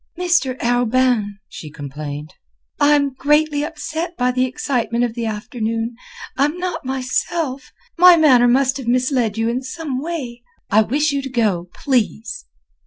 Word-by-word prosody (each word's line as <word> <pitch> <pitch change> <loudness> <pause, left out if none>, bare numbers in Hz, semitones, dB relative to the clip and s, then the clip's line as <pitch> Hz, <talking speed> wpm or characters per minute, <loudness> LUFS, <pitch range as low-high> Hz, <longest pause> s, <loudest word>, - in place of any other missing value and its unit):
"Mr. 345 -8 +1
Arobin," 245 -3 +1
she 155 - -9
complained, 145 +1 -7 0.5
"I'm 290 -2 +3
greatly 295 +2 +2
upset 330 +2 -5
by 250 0 +2
the 255 0 +1
excitement 240 -2 -1
of 240 -2 -1
the 230 -1 -3
afternoon; 225 +1 -3 0.4
I'm 295 +5 +1
not 360 0 -3
myself. 265 +2 -2 0.3
My 360 -1 +9
manner 260 -6 +5
must 260 +2 +2
have 265 -4 -7
misled 250 -3 +1
you 225 0 0
in 240 +2 -1
some 270 -1 -5
way. 275 -7 -5 0.3
I 215 +2 +6
wish 290 +7 +1
you 280 -1 -1
to 270 - -6
go, 205 -8 0
please." 250 - -1
255 Hz, 145 wpm, -20 LUFS, 230-290 Hz, 0.5 s, My